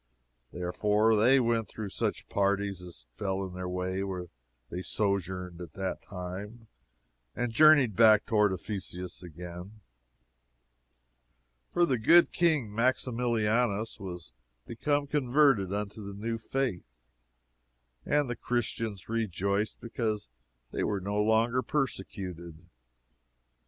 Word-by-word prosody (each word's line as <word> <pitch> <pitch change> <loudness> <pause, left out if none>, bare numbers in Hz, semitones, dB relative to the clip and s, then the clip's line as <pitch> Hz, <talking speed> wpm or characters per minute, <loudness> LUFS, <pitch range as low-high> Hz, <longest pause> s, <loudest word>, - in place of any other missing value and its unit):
Therefore 105 +5 +2
they 125 +6 +5
went 115 -2 +1
through 105 -3 -6
such - - -2
parties 100 -1 0
as 90 -8 -12
fell 95 +8 -2
in 95 - -8
their 90 0 -4
way 90 +1 -2
where 90 -3 -4 0.4
they 90 - -4
sojourned 95 -2 -2
at 85 - -9
that 95 -1 -3
time, 100 +5 -7 0.7
and 120 -1 -1
journeyed 145 -6 +6
back 110 0 +6
toward 105 -2 +3
Ephesus 90 -2 -5
again. 90 +4 -9 1.9
For 175 - +3
the 130 -7 0
good 170 +10 +6
King 155 -11 +1
Maximilianus 115 -2 +1
was 90 -9 -8 0.3
become 145 +5 0
converted 135 -7 +3
unto 105 +1 -4
the 100 0 -7
new 115 +3 -3
faith, 90 - -3 1.0
and 145 - +1
the 120 - -3
Christians 115 -5 -3
rejoiced 105 -2 -1
because 110 - -3 0.4
they - - -2
were 100 -2 0
no 100 +2 -1
longer 115 +3 +3
persecuted. 95 - -4
105 Hz, 115 wpm, -29 LUFS, 95-115 Hz, 1.9 s, journeyed